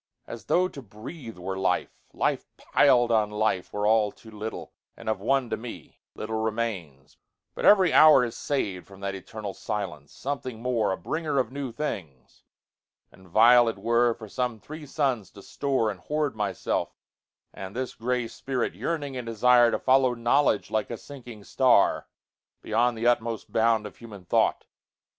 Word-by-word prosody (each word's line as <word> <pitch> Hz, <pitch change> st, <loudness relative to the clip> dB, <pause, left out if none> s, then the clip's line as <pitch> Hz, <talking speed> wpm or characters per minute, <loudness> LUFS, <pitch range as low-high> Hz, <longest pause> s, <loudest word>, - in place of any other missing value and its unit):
As 115 Hz, -, -9 dB
tho' 180 Hz, +1 st, +2 dB
to 140 Hz, -, -10 dB
breathe 115 Hz, -, -10 dB
were 95 Hz, +2 st, -4 dB
life. -, -, 0 dB, 0.2 s
Life -, -, -1 dB
pil'd 120 Hz, -2 st, +3 dB
on 110 Hz, -2 st, +3 dB
lifeWere 105 Hz, -1 st, -1 dB
all 110 Hz, -1 st, +3 dB
too 110 Hz, -, -16 dB
little, 110 Hz, +1 st, -7 dB, 0.2 s
and -, -, -12 dB
of 110 Hz, -3 st, 0 dB
one 135 Hz, +3 st, +1 dB
to -, -, 0 dB
meLittle 110 Hz, -1 st, -7 dB
remains: 105 Hz, -12 st, -4 dB, 0.4 s
but -, -, -4 dB
every 190 Hz, -5 st, +6 dB
hour 150 Hz, -5 st, +7 dB
is 115 Hz, -, -5 dB
sav'dFrom 100 Hz, -8 st, -3 dB
that 100 Hz, 0 st, -3 dB
eternal 100 Hz, +1 st, -7 dB
silence, 90 Hz, -11 st, -5 dB
something 130 Hz, -4 st, -5 dB
more,A 115 Hz, -5 st, 0 dB
bringer 155 Hz, -3 st, -3 dB
of 125 Hz, -3 st, +1 dB
new 140 Hz, -2 st, -4 dB
things; 80 Hz, -, -6 dB, 0.7 s
and 95 Hz, 0 st, -18 dB
vile 120 Hz, +6 st, +6 dB
it 115 Hz, -, -1 dB
wereFor 115 Hz, +1 st, +1 dB
some 120 Hz, +1 st, -3 dB
three 155 Hz, +6 st, -10 dB
suns 130 Hz, -, -1 dB
to 100 Hz, -, -14 dB
store 130 Hz, -6 st, -1 dB
and 95 Hz, -, -10 dB
hoard 150 Hz, +5 st, -2 dB
myself, 100 Hz, -4 st, -2 dB, 0.6 s
And 95 Hz, +2 st, -8 dB
this 130 Hz, 0 st, -3 dB
gray 125 Hz, +1 st, -2 dB
spirit 130 Hz, +1 st, -3 dB
yearning 145 Hz, -5 st, -3 dB
in 125 Hz, -2 st, -5 dB
desireTo 120 Hz, +1 st, +4 dB
follow 130 Hz, -1 st, +3 dB
knowledge 120 Hz, -2 st, +2 dB
like 110 Hz, -1 st, -1 dB
a 115 Hz, -, -4 dB
sinking 120 Hz, -2 st, -11 dB
star, 125 Hz, -2 st, +3 dB, 0.6 s
Beyond 120 Hz, +2 st, +1 dB
the 115 Hz, -, -3 dB
utmost 115 Hz, -2 st, 0 dB
bound 110 Hz, -1 st, +2 dB
of 105 Hz, -, -9 dB
human 105 Hz, -6 st, -12 dB
thought. -, -, +1 dB
115 Hz, 155 wpm, -26 LUFS, 105-130 Hz, 0.7 s, hour